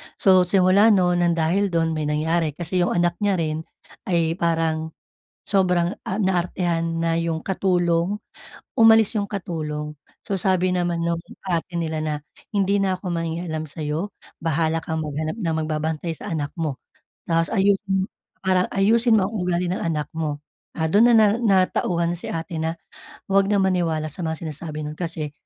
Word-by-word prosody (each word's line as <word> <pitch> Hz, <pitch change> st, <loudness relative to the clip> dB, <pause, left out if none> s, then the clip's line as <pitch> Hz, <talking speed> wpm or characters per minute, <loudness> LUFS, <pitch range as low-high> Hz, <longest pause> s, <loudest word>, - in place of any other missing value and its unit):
So 185 Hz, -2 st, +4 dB
simula 190 Hz, +3 st, +5 dB
no'n, 180 Hz, -3 st, +3 dB
nang 170 Hz, -1 st, +2 dB
dahil 170 Hz, +5 st, +1 dB
dun, 165 Hz, -3 st, 0 dB
may 155 Hz, -2 st, -2 dB
nangyari 155 Hz, 0 st, 0 dB
kasi 175 Hz, +2 st, -2 dB
yung 175 Hz, -, +1 dB
anak 175 Hz, 0 st, +1 dB
niya 205 Hz, -2 st, +2 dB
rin 155 Hz, -1 st, -1 dB, 0.5 s
ay 170 Hz, -1 st, +1 dB
parang 160 Hz, -1 st, 0 dB, 0.6 s
sobrang, 180 Hz, -2 st, +2 dB
ah, 200 Hz, +3 st, -2 dB
na-artehan 175 Hz, -3 st, 0 dB
na 165 Hz, 0 st, +1 dB
yung 165 Hz, -1 st, -1 dB
katulong. 180 Hz, +1 st, 0 dB, 0.6 s
Umalis 225 Hz, -1 st, +6 dB
yung 200 Hz, -, -1 dB
katulong. 150 Hz, -6 st, -4 dB, 0.2 s
So 195 Hz, -1 st, -2 dB
sabi 185 Hz, -1 st, +2 dB
naman 175 Hz, -2 st, 0 dB
nung 170 Hz, 0 st, 0 dB, 0.3 s
ate 175 Hz, 0 st, -2 dB
nila 160 Hz, -1 st, -2 dB
na, 155 Hz, -1 st, -1 dB, 0.4 s
“Hindi 200 Hz, 0 st, +2 dB
na 195 Hz, -1 st, +1 dB
ako 185 Hz, -1 st, -5 dB
mangingialam 165 Hz, -1 st, -3 dB
sa'yo, 155 Hz, +6 st, -4 dB, 0.2 s
bahala 160 Hz, 0 st, 0 dB
kang 160 Hz, 0 st, -3 dB
maghanap 155 Hz, +1 st, -3 dB
ng 180 Hz, -8 st, -2 dB
magbabantay 155 Hz, +1 st, -2 dB
sa -, -, -8 dB
anak 150 Hz, -3 st, -3 dB
mo. 155 Hz, -6 st, -3 dB, 0.5 s
Tapos 165 Hz, 0 st, +1 dB
ayusin 195 Hz, -1 st, +1 dB, 0.4 s
ah 185 Hz, -1 st, +4 dB
ayusin 225 Hz, +4 st, +4 dB
mo 190 Hz, -, +1 dB
ang -, -, -11 dB
ugali 180 Hz, -1 st, 0 dB
ng 185 Hz, -, -1 dB
anak 155 Hz, -3 st, -2 dB
mo.” 150 Hz, -2 st, -2 dB, 0.4 s
Ah, 160 Hz, -, 0 dB
dun 205 Hz, +9 st, +5 dB
na 240 Hz, -, +5 dB, 0.3 s
natauhan 185 Hz, -4 st, +2 dB
si 175 Hz, -, -6 dB
ate 165 Hz, 0 st, -4 dB
na 160 Hz, +1 st, -2 dB, 0.5 s
huwag 195 Hz, 0 st, +2 dB
na 205 Hz, -, +2 dB
maniwala 170 Hz, -5 st, +1 dB
sa 180 Hz, -, -6 dB
mga 160 Hz, 0 st, -3 dB
sinasabi 155 Hz, 0 st, -6 dB
nun. 150 Hz, -, -4 dB
Kasi 160 Hz, -4 st, -3 dB
170 Hz, 165 wpm, -23 LUFS, 160-190 Hz, 0.6 s, Umalis